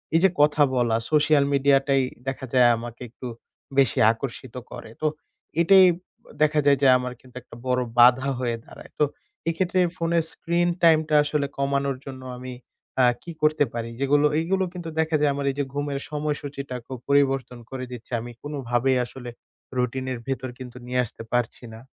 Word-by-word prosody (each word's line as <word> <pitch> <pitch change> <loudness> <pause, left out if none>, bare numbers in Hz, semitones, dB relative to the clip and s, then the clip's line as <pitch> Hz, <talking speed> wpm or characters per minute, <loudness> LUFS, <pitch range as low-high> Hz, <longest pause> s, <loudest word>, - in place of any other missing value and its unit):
এই - - +6
যে 190 - +7
কথা 150 0 +4
বলা 120 -2 +2 0.2
social 150 -1 +4
media 140 0 +4
টাই 135 -1 +3 0.3
দেখা 135 0 -3
যায় 125 -2 +6
আমাকে 120 +1 -8
একটু 125 +2 -9 0.5
বেশি 135 -4 +4
আকর্ষিত 120 +1 -7 0.2
করে। 120 -2 -9
তো 155 - +2 0.5
এটাই 190 +2 +7 0.6
দেখা 155 0 +4
যায় 140 -1 +5
যে 140 - +5
আমার 125 0 -4
কিন্তু 125 -1 -20
একটা 115 - -14
বড় 125 0 +2 0.2
বাধা 125 +3 +6
হয়ে 120 -2 -1
দাঁড়ায়। - - -14
তো - - +5 0.5
এক্ষেত্রে 180 +2 0 0.2
ফোনের 165 0 +1
screen 175 +1 0
time 160 -2 +6
টা 155 - +3
আসলে 145 -1 0
কমানোর 140 -1 0
জন্য 130 -1 -8 0.2
আমি, 130 0 -7 0.5
আ - - +5 0.2
কি 170 - -7
করতে 155 0 +3
পারি? 115 0 -4
যেগুলো, 145 +2 +3
এইগুলো 190 +4 0
কিন্তু 175 -2 -6
দেখা 160 0 +1
যায় 150 -1 +3
আমার 140 0 -3
এই - - -10
যে - - +2
ঘুমের 145 -1 -2
সময়সূচিটা 145 -3 -4
খুব 130 - -7
পরিবর্তন 135 -3 +2
করে 130 -1 -5
দিচ্ছে। 120 -1 -10
আমি 120 +1 -8
কোনো 145 0 -5
ভাবেই 125 +2 +2
আসলে 125 0 -9 0.5
routine 130 +1 -1
এর 120 - -6
ভেতর 130 -1 -3
কিন্তু 125 -1 -9
নিয়ে 125 0 -1
আসতে 115 - -9
পারছি 120 0 -1
না। 110 - -10
135 Hz, 180 wpm, -24 LUFS, 125-150 Hz, 0.6 s, যে